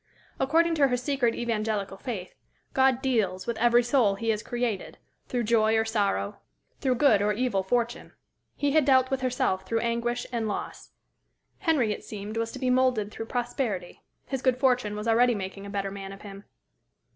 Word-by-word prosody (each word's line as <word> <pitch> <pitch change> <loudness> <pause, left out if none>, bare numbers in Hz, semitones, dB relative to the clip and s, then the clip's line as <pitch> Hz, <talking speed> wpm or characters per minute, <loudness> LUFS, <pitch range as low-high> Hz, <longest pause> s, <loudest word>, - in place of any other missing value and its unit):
According 330 +5 +3
to 280 - +7
her 250 -1 0
secret 250 -2 0
Evangelical 215 -4 -2
faith, 205 -6 -6 0.4
God 265 -1 +3
"deals" 210 -8 0
with 235 - -2
every 240 +1 +5
soul 240 -5 +3
he 225 +3 -3
has 215 -1 +1
created 240 -4 -3 0.3
through 245 -1 -1
joy 220 0 +3
or 220 - +2
sorrow, 200 - -1 0.4
through 255 -2 +1
good 250 -5 +4
or 210 +1 +2
evil 225 -3 0
fortune. 235 +4 -2 0.4
He 285 -1 0
had 310 +1 +4
dealt 260 -1 +4
with 270 -1 0
herself 245 -7 0
through 225 +4 -1
anguish 235 +1 -1
and 230 -2 -1
loss. 205 - -5 0.7
Henry, 300 - +2
it - - -9
seemed, 210 +1 -7
was 230 0 -1
to - - -6
be 255 -1 0
moulded 250 -5 +2
through 225 - -6
prosperity. 240 -7 -3 0.2
His 270 -2 -3
good 255 -1 +2
fortune 250 -5 +1
was 210 +2 -4
already 240 +1 +4
making 195 0 -6
a - - -7
better 200 -1 -2
man 195 -1 -7
of 195 - -11
him. 200 -1 -10
235 Hz, 180 wpm, -27 LUFS, 205-255 Hz, 0.7 s, to